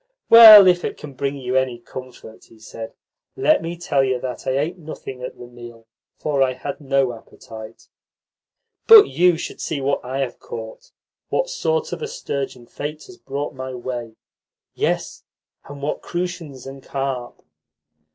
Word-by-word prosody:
"Well, 220 Hz, -3 st, +12 dB
if 180 Hz, -1 st, +3 dB
it -, -, -4 dB
can 145 Hz, -2 st, -10 dB
bring 140 Hz, +2 st, -3 dB
you 130 Hz, -1 st, -4 dB
any 130 Hz, -2 st, +1 dB
comfort," 120 Hz, -2 st, -11 dB
he 115 Hz, -, -20 dB
said, 110 Hz, +1 st, -9 dB, 0.4 s
"let 310 Hz, -6 st, +3 dB
me 170 Hz, +1 st, -5 dB
tell 145 Hz, -5 st, +1 dB
you 130 Hz, -1 st, 0 dB
that 125 Hz, 0 st, -6 dB
I 130 Hz, 0 st, +1 dB
ate 165 Hz, +6 st, -2 dB
nothing 140 Hz, -5 st, -9 dB
at 125 Hz, -, -7 dB
the 120 Hz, -, -10 dB
meal, 120 Hz, -1 st, -13 dB, 0.3 s
for 145 Hz, -3 st, -1 dB
I 130 Hz, -1 st, +2 dB
had 140 Hz, +4 st, -7 dB
no 135 Hz, -3 st, +1 dB
appetite." 110 Hz, 0 st, -12 dB, 1.0 s
"But 435 Hz, -2 st, +9 dB
you 180 Hz, -1 st, +3 dB
should -, -, -7 dB
see 155 Hz, -, -3 dB
what 140 Hz, +1 st, -1 dB
I 130 Hz, +2 st, -3 dB
have 130 Hz, -3 st, -4 dB
caught 110 Hz, -1 st, -9 dB, 0.4 s
what -, -, -1 dB
sort 485 Hz, -1 st, -1 dB
of -, -, -6 dB
a 455 Hz, -, -3 dB
sturgeon 140 Hz, -, -5 dB
fate 150 Hz, +5 st, -7 dB
has 375 Hz, -, -14 dB
brought 140 Hz, +2 st, -5 dB
my 130 Hz, 0 st, -6 dB
way! 120 Hz, -2 st, -6 dB, 0.6 s
Yes, -, -, -2 dB, 0.4 s
and 140 Hz, 0 st, -10 dB
what 150 Hz, -, -2 dB
crucians 175 Hz, -7 st, -5 dB
and 135 Hz, 0 st, -9 dB
carp!" 135 Hz, -2 st, -5 dB
135 Hz, 165 wpm, -21 LUFS, 125-165 Hz, 1.0 s, Well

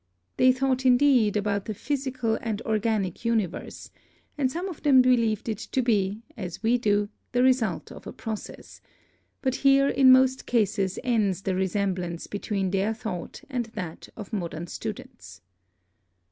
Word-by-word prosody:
They 255 Hz, -, +6 dB
thought, 260 Hz, 0 st, 0 dB
indeed, 250 Hz, -5 st, +4 dB
about 200 Hz, -1 st, -1 dB
the 215 Hz, -, -4 dB
physical 255 Hz, -2 st, -2 dB
and 220 Hz, -3 st, -3 dB
organic 215 Hz, -4 st, -1 dB
universe, 220 Hz, -7 st, -2 dB, 0.4 s
and 265 Hz, -3 st, 0 dB
some 345 Hz, +5 st, -3 dB
of 355 Hz, -6 st, -8 dB
them 280 Hz, -4 st, +5 dB
believed 230 Hz, -4 st, +2 dB
it 220 Hz, -, -2 dB
to 260 Hz, -, -2 dB
be, 210 Hz, -2 st, 0 dB
as 185 Hz, +1 st, -7 dB
we 240 Hz, +2 st, +3 dB
do, 205 Hz, -2 st, +1 dB, 0.2 s
the 245 Hz, 0 st, +3 dB
result 250 Hz, -8 st, +1 dB
of -, -, -11 dB
a -, -, -5 dB
process; 220 Hz, -2 st, -8 dB, 0.6 s
but 260 Hz, -2 st, 0 dB
here 275 Hz, 0 st, +5 dB
in 265 Hz, -1 st, +6 dB
most 260 Hz, 0 st, +4 dB
cases 205 Hz, -5 st, +1 dB
ends 210 Hz, -7 st, +1 dB
the 190 Hz, -, -1 dB
resemblance 185 Hz, -2 st, -2 dB
between 200 Hz, -2 st, -2 dB
their 200 Hz, +3 st, 0 dB
thought 185 Hz, -6 st, -6 dB
and 245 Hz, -4 st, -3 dB
that 180 Hz, -6 st, -6 dB
of 210 Hz, 0 st, -9 dB
modern 170 Hz, -4 st, -3 dB
students. -, -, -8 dB
220 Hz, 150 wpm, -26 LUFS, 200-255 Hz, 0.6 s, They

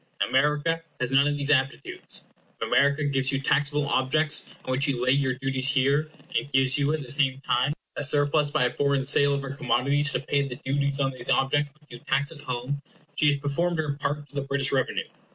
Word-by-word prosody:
America 150 Hz, +4 st, +1 dB, 0.2 s
has 125 Hz, 0 st, -1 dB
none 135 Hz, +1 st, +4 dB
of 145 Hz, 0 st, -1 dB
these 140 Hz, +1 st, 0 dB
aptitudes. 135 Hz, -1 st, -2 dB, 0.3 s
If -, -, -2 dB
America 140 Hz, +2 st, +3 dB
gives 135 Hz, -2 st, 0 dB
you 135 Hz, -, 0 dB
taxable 145 Hz, +1 st, +1 dB
objects 145 Hz, +3 st, +1 dB, 0.2 s
on -, -, -3 dB
which 135 Hz, +3 st, +1 dB
you 135 Hz, -3 st, -1 dB
lay 130 Hz, -, +3 dB
your 135 Hz, -2 st, +1 dB
duties 135 Hz, 0 st, 0 dB
here, 140 Hz, +3 st, +2 dB, 0.3 s
and 140 Hz, -, -1 dB
gives 130 Hz, -1 st, +4 dB
you, 140 Hz, +1 st, +1 dB
at 155 Hz, -, -2 dB
the 125 Hz, -, -10 dB
same 135 Hz, -2 st, +3 dB
time, 130 Hz, +2 st, +1 dB, 0.2 s
a -, -, -2 dB
surplus 145 Hz, +1 st, +3 dB
by 150 Hz, -1 st, +1 dB
a 125 Hz, -1 st, 0 dB
foreign 140 Hz, -1 st, +1 dB
sale 140 Hz, +1 st, +3 dB
of 140 Hz, -, -3 dB
her 135 Hz, -, -5 dB
commodities 140 Hz, +2 st, +1 dB
to -, -, +1 dB
pay 140 Hz, +1 st, 0 dB
the 125 Hz, -, -6 dB
duties 140 Hz, +1 st, +1 dB
on 135 Hz, -1 st, +1 dB
these 125 Hz, -2 st, -5 dB
objects 145 Hz, +2 st, +1 dB
which 150 Hz, -, -24 dB
you 120 Hz, -, -9 dB
tax 140 Hz, +5 st, 0 dB
at 160 Hz, -, -10 dB
home, 130 Hz, +1 st, -4 dB, 0.3 s
she 150 Hz, -, +2 dB
has 145 Hz, -1 st, +3 dB
performed 160 Hz, +5 st, -1 dB
her 155 Hz, -2 st, -1 dB
part 145 Hz, +1 st, -3 dB
to 140 Hz, -, -24 dB
the 140 Hz, -, -1 dB
British 140 Hz, 0 st, -1 dB
revenue. 130 Hz, -2 st, 0 dB
140 Hz, 220 wpm, -26 LUFS, 135-145 Hz, 0.3 s, none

